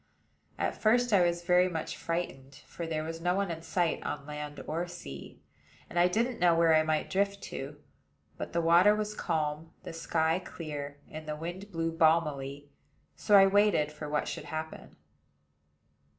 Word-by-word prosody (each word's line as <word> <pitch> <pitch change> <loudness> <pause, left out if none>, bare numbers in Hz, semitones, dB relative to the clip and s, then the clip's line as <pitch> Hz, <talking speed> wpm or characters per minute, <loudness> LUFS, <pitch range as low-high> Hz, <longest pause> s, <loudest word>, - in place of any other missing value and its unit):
At - - -1
first 240 +1 +3
I 195 - +6
was 175 0 0
very 180 +1 +4
much 160 -3 -4
frightened; 140 -5 -4
for 170 - -6
there 155 -1 -2
was 165 +1 -6
no 175 +1 +1
one 195 -2 0
in 165 -1 -5
sight 165 0 0
on 145 - -4
land 150 0 -6
or 170 +3 -2
sea, 70 - -10 0.5
and 175 - 0
I 175 - +6
didn't 230 +6 0
know 175 -1 +5
where 165 -1 +4
I 155 - +6
might 155 0 0
drift 200 +1 0
to. 140 +2 -6 0.6
But - - -6
the 170 - +1
water 175 +5 +6
was 210 0 -2
calm, 160 -4 -2
the - - -7
sky 165 +1 0
clear, 145 -5 -7
and 155 0 -8
the 150 - -3
wind 175 +6 -7
blew 165 -1 -1
balmily; 150 -4 +1 0.4
so 210 - +3
I 195 -1 +9
waited 195 -6 +3
for 150 0 -7
what 150 0 -1
should - - -5
happen. 160 0 -6
165 Hz, 175 wpm, -30 LUFS, 150-180 Hz, 0.6 s, I